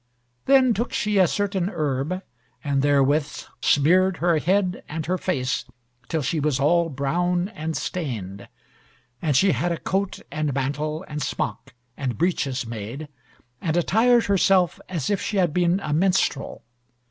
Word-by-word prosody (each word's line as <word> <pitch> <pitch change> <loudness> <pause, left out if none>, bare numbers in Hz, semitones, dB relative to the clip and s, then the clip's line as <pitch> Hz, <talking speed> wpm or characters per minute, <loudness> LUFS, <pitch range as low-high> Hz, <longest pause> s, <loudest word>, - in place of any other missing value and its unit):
Then 260 -3 +5
took 235 +3 -3
she 210 -1 +1
a 185 - +6
certain 195 -1 -1
herb, 155 +2 -2 0.4
and 140 -2 +1
therewith 145 +1 +2 0.2
smeared 180 +6 +3
her 170 -2 +2
head 185 +3 +1
and 155 0 -4
her 185 +2 -1
face, 130 -8 -1 0.4
till 160 -3 -1
she 155 +4 -1
was 145 -2 0
all 170 +4 +3
brown 175 +6 0
and 160 -5 -4
stained. 105 - -5 0.7
And 150 -4 0
she 195 +5 +4
had 175 0 0
a 170 - -1
coat, 195 +3 -2
and 150 -4 -2
mantle, 150 +5 -2
and 150 0 -5
smock, 125 -2 -4 0.2
and 130 -3 -3
breeches 140 -7 0
made, 115 +6 -6 0.5
and 165 -1 0
attired 230 +7 +3
herself 190 -3 +3
as 170 -1 -2
if 200 - 0
she 210 - -2
had 175 -5 +2
been 175 +1 +2
a 150 - -2
minstrel. 175 -4 0
165 Hz, 150 wpm, -24 LUFS, 140-185 Hz, 0.7 s, a